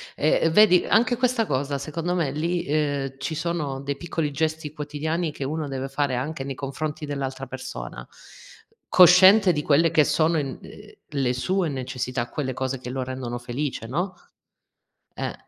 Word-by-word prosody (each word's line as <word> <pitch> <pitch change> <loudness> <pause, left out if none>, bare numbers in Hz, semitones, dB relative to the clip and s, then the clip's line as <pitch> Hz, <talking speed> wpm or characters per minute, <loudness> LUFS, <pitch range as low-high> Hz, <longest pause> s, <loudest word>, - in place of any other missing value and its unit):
E 155 - +2
e 165 - +4
vedi, 180 0 +6
anche 235 +3 +3
questa 250 -3 +1
cosa 140 -1 -1
secondo 165 +5 -3
me 155 -6 0
lì, 170 +4 -1
ehm, 145 -2 -1
ci 160 +3 -3
sono 155 -4 -2
dei 140 0 -3
piccoli 160 -3 -2
gesti 155 0 -2
quotidiani 155 +2 -3
che 140 - -6
uno 150 +2 -3
deve 135 0 -4
fare 135 -2 -1
anche 135 +2 -3
nei 135 -1 -4
confronti 150 +3 -4
dell'altra 135 -2 -4
persona, 60 - -7 0.8
cosciente 185 +2 +7
di 150 -2 -1
quelle 155 +3 +3
che 155 -2 +5
sono 155 +2 +2
in 135 -3 -4
ehm, - - -13 0.2
le 135 -3 0
sue 175 +8 0
necessità, 125 -2 -3
quelle 130 -4 -3
cose 130 0 -3
che 125 - -7
lo 130 0 -3
rendono 125 -2 -5
felice, 120 -1 -4
no? 180 +9 -2 1.1
Eh. - - -3
145 Hz, 165 wpm, -24 LUFS, 135-165 Hz, 1.1 s, cosciente